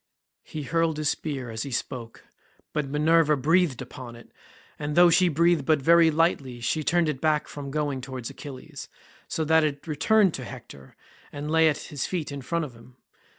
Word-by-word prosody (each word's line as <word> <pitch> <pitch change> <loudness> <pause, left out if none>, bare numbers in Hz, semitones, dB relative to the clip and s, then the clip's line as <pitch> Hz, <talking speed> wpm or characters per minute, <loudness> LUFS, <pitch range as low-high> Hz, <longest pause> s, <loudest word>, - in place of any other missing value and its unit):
He 155 - -7
hurled 165 +1 0
his 155 -1 0
spear 135 -6 -4
as 110 0 -4
he 140 - -4
spoke, 120 -1 -5 0.5
but 150 -2 -1
Minerva 155 +1 +3
breathed 155 -2 +2
upon 125 -1 -10
it, 120 - -15 0.5
and 150 0 -3
though 175 0 +7
she 180 +1 +4
breathed 170 0 +2
but 155 +2 +3
very 165 +3 +5
lightly 150 -6 0
she 150 +6 -1
turned 175 +1 +2
it 150 -4 -3
back 155 -1 +1
from 140 -1 -7
going 145 -2 -2
towards 130 -2 -6
Achilles, 135 -4 -9 0.4
so 160 - -2
that 160 +1 +4
it 145 -2 -2
returned 185 +5 +3
to 130 - -5
Hector 115 - -11 0.4
and 145 +1 -5
lay 160 0 +5
at 145 - -1
his 145 -3 -5
feet 170 -6 -3
in 140 -1 -6
front 165 +5 -2
of 135 - -10
him. 115 +2 -17
150 Hz, 190 wpm, -26 LUFS, 130-160 Hz, 0.5 s, though